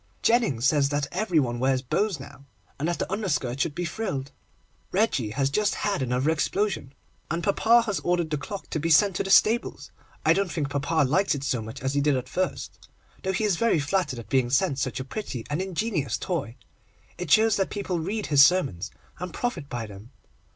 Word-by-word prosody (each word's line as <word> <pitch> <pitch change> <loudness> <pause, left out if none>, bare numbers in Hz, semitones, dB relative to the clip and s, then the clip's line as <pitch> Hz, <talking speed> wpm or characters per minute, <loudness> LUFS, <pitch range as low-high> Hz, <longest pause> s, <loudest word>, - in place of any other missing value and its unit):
Jennings 225 - +2
says 140 -1 +3
that 145 0 0
every 185 -3 +1
one 120 -4 -1
wears 130 0 +1
bows 190 - 0
now, 140 0 -12 0.3
and 150 - -1
that 175 - -1
the - - -3
underskirt 155 - -1
should 150 0 -1
be 175 - -2
frilled. 160 -8 -4 0.6
Reggie 185 - +1
has 135 +5 0
just 210 +5 +1
had 200 -7 -1
another 130 +4 +1
explosion, 160 -3 -1 0.3
and 170 +1 -2
papa 230 +4 +4
has 210 -4 -2
ordered 175 -2 0
the 150 - +1
clock 200 +6 -7
to 155 - -1
be 165 +3 -1
sent 190 +4 +5
to - - 0
the 195 - -5
stables. 215 +5 +3 0.3
I - - +6
don't 195 -3 0
think 145 -4 -2
papa 145 +1 +1
likes 185 +4 +2
it 140 - -5
so 130 -4 -1
much 110 +1 -8
as 130 +1 0
he 145 - +2
did 145 -2 +2
at 130 0 -4
first, 185 +7 -3 0.4
though 190 - -1
he 190 +4 -1
is 205 -5 +2
very 230 -4 +3
flattered 155 -2 -1
at 115 -4 -8
being 125 +1 +1
sent 135 +1 +1
such 130 -2 -2
a 130 - -5
pretty 135 - -5
and 150 +5 0
ingenious 180 - -1
toy. 140 - -3 0.6
It 180 -3 -4
shows 220 +4 +5
that 195 - 0
people 190 -4 -3
read 200 +6 -3
his 140 -2 +6
sermons, 140 - +2 0.3
and 180 -1 -5
profit 170 - -3
by 120 -2 -4
them. 105 +2 -12
160 Hz, 205 wpm, -26 LUFS, 135-195 Hz, 0.6 s, I